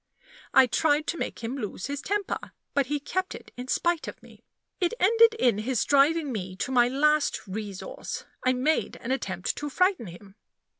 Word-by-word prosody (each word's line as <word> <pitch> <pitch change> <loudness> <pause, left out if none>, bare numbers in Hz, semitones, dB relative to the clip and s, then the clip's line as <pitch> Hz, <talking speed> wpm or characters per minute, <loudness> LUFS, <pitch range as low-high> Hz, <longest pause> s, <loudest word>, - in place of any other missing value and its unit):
I 265 - +7
tried 295 +4 +2
to 335 - -2
make - - -4
him 230 +4 -3
lose 210 -6 -5
his 280 0 -4
temper; 405 +2 -3 0.2
but 280 -2 +2
he 295 +1 -1
kept 370 +6 -3
it - - -12
in 250 +1 -7
spite 340 +4 0
of - - -8
me. - - -17 0.4
It 360 +3 0
ended 455 +4 +5
in 240 - +2
his 240 +1 0
driving 290 +1 +3
me 185 -5 -4
to 225 - -3
my 245 -2 +5
last 300 +3 +2
resource 200 -1 -6 0.2
I 255 - +3
made 275 +5 0
an 235 - -5
attempt 190 -9 -2
to 295 - -3
frighten 365 - +1
him. 195 +4 -13
275 Hz, 185 wpm, -27 LUFS, 230-320 Hz, 0.4 s, I